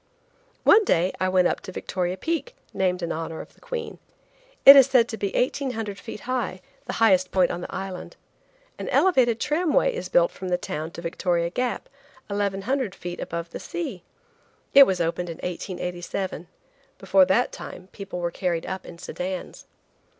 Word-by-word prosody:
One 435 Hz, -, +7 dB
day 180 Hz, -, +2 dB
I 185 Hz, -, +1 dB
went 185 Hz, -1 st, +4 dB
up -, -, -1 dB
to -, -, -8 dB
Victoria 180 Hz, 0 st, -3 dB
Peak, 320 Hz, -, -3 dB, 0.2 s
named 185 Hz, -2 st, 0 dB
in 170 Hz, -, -2 dB
honor 160 Hz, 0 st, -4 dB
of -, -, -10 dB
the -, -, -27 dB
Queen. 485 Hz, -2 st, -5 dB, 0.7 s
It 275 Hz, -, +13 dB
is 270 Hz, -2 st, +8 dB
said 250 Hz, -4 st, +4 dB
to 225 Hz, -, -3 dB
be 200 Hz, -2 st, -2 dB
1,800 225 Hz, -6 st, -1 dB
feet -, -, -8 dB
high, 250 Hz, -7 st, -2 dB, 0.3 s
the -, -, -3 dB
highest 190 Hz, -5 st, +4 dB
point 185 Hz, -2 st, +2 dB
on 175 Hz, -, -4 dB
the -, -, -7 dB
island. 190 Hz, -, -6 dB, 0.6 s
An -, -, -4 dB
elevated 255 Hz, -11 st, +3 dB
tramway 320 Hz, -, +2 dB
is 475 Hz, -, -5 dB
built -, -, +4 dB
from 185 Hz, -, -7 dB
the 180 Hz, -, +2 dB
town 155 Hz, -2 st, -5 dB
to 170 Hz, -, -8 dB
Victoria 170 Hz, 0 st, -1 dB
Gap, 250 Hz, +4 st, -2 dB, 0.4 s
1,100 205 Hz, +3 st, -1 dB
feet 175 Hz, 0 st, -7 dB
above 170 Hz, 0 st, -5 dB
the -, -, -6 dB
sea. 175 Hz, +2 st, -5 dB, 0.7 s
It 275 Hz, 0 st, +9 dB
was 185 Hz, -2 st, 0 dB
opened 170 Hz, +1 st, -1 dB
in 165 Hz, -, -6 dB
1887. 180 Hz, 0 st, -4 dB, 0.5 s
Before 190 Hz, -1 st, +4 dB
that 210 Hz, +7 st, +2 dB
time 185 Hz, -, -9 dB
people 195 Hz, -3 st, -7 dB
were 170 Hz, 0 st, -1 dB
carried 170 Hz, -2 st, -2 dB
up 190 Hz, 0 st, -5 dB
in 170 Hz, -, -10 dB
sedans. 180 Hz, +2 st, -6 dB
190 Hz, 170 wpm, -25 LUFS, 175-245 Hz, 0.7 s, It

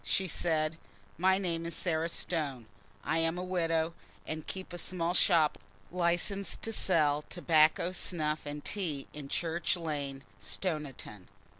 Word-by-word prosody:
She 190 Hz, -, +1 dB
said, 160 Hz, -2 st, +1 dB, 0.4 s
"My 190 Hz, +1 st, +5 dB
name 170 Hz, -4 st, -1 dB
is 170 Hz, -1 st, -3 dB
Sarah 165 Hz, -2 st, +1 dB
Stone. 145 Hz, -9 st, -2 dB, 0.4 s
I 160 Hz, +3 st, +1 dB
am 165 Hz, +1 st, +1 dB
a 180 Hz, -, -2 dB
widow, 165 Hz, -3 st, +1 dB, 0.3 s
and 155 Hz, 0 st, -5 dB
keep 190 Hz, -2 st, -6 dB
a 175 Hz, -, -4 dB
small 175 Hz, -1 st, 0 dB
shop 165 Hz, -5 st, +4 dB, 0.3 s
licensed 180 Hz, +3 st, 0 dB
to 225 Hz, -, -2 dB
sell 150 Hz, -8 st, +3 dB
tobacco, 165 Hz, 0 st, +4 dB
snuff, 155 Hz, -5 st, -1 dB
and 145 Hz, 0 st, -5 dB
tea 160 Hz, -9 st, -1 dB
in 145 Hz, -2 st, -7 dB
Church 170 Hz, +3 st, 0 dB
Lane, 145 Hz, -5 st, -3 dB, 0.2 s
Stoniton. 140 Hz, -, -4 dB
165 Hz, 140 wpm, -32 LUFS, 150-180 Hz, 0.4 s, My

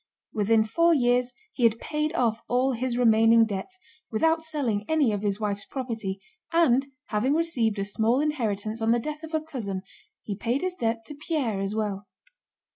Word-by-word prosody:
Within 220 Hz, +1 st, +3 dB
four 335 Hz, +10 st, +3 dB
years 245 Hz, -1 st, +2 dB, 0.2 s
he -, -, -7 dB
had 230 Hz, -1 st, +4 dB
paid 305 Hz, 0 st, -2 dB
off 230 Hz, -5 st, +1 dB
all 255 Hz, +2 st, +2 dB
his 245 Hz, 0 st, -2 dB
remaining 225 Hz, -1 st, +5 dB
debts 215 Hz, -, -5 dB, 0.3 s
without 320 Hz, +8 st, +2 dB
selling 275 Hz, -10 st, -1 dB
any 305 Hz, -7 st, +3 dB
of 205 Hz, -1 st, -2 dB
his 205 Hz, -1 st, -1 dB
wife's 205 Hz, -2 st, -2 dB
property, 225 Hz, -7 st, -4 dB, 0.3 s
and 275 Hz, -6 st, +3 dB, 0.2 s
having 240 Hz, +7 st, +1 dB
received 250 Hz, -11 st, 0 dB
a 200 Hz, -, -1 dB
small 220 Hz, +5 st, +1 dB
inheritance 225 Hz, -7 st, -1 dB
on 225 Hz, -, +1 dB
the 240 Hz, -, +2 dB
death 300 Hz, +5 st, -5 dB
of 320 Hz, 0 st, -5 dB
a 315 Hz, -, +1 dB
cousin 220 Hz, -12 st, -5 dB, 0.4 s
he 205 Hz, -, -4 dB
paid 240 Hz, +6 st, -1 dB
his 370 Hz, -1 st, -1 dB
debt 225 Hz, -7 st, -2 dB
to 295 Hz, -, -7 dB
Pierre 290 Hz, -, -2 dB
as 195 Hz, +2 st, -2 dB
well. 205 Hz, -2 st, -2 dB
235 Hz, 180 wpm, -26 LUFS, 215-295 Hz, 0.4 s, remaining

